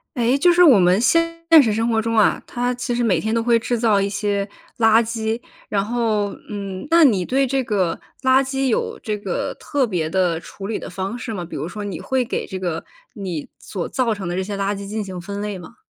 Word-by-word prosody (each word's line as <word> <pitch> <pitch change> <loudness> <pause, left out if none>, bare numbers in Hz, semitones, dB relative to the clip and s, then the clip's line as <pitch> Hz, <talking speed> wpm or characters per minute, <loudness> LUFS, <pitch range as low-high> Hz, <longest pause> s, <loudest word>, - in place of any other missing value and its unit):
诶， 245 +2 +2
就 350 +5 +5
是 350 +1 +4
我 290 -10 +8
们 180 +1 +4
现 335 +6 +2 0.2
实 225 - +1
生 225 +2 0
活 225 -1 +2
中 230 0 -1
啊， 215 - +4
它 245 0 -1
其 245 0 -3
实 240 - 0
每 215 -7 +3
天 220 +1 -1
都 230 - +2
会 235 0 +3
制 230 +1 -1
造 215 -4 +3
一 200 - 0
些 200 0 -1 0.3
垃 225 0 +5
圾， 225 0 -2 0.3
然 200 -1 +1
后， 215 -3 0 0.2
嗯， 195 -2 -5
那 335 -1 +7
你 205 -9 +3
对 270 +7 +1
这 265 +1 0
个 190 -7 0 0.3
垃 260 +1 +5
圾 270 0 -1
有 235 - -1
这 215 -1 -2
个 205 - -3
特 280 -4 -1
别 170 -7 -1
的 180 -2 +1
处 195 +2 -8
理 220 - -2
的 - - -7
方 195 +5 -4
式 230 -1 -5
吗？ 180 -4 -4
比 170 - -9
如 - - -3
说 210 0 -6
你 190 -5 -5
会 260 -1 0
给 - - -3
这 190 - -6
个， 175 -3 -3 0.3
你 185 - -5
所 185 -4 -5
造 245 -3 0
成 200 -4 -5
的 175 - -2
这 190 - -1
些 200 +1 -5
垃 200 +1 -1
圾 200 0 -7
进 215 +2 -3
行 185 -3 -6
分 200 +3 -6
类 210 -2 -3
吗？ 180 - -12
215 Hz, 255 characters per minute, -21 LUFS, 195-240 Hz, 0.3 s, 我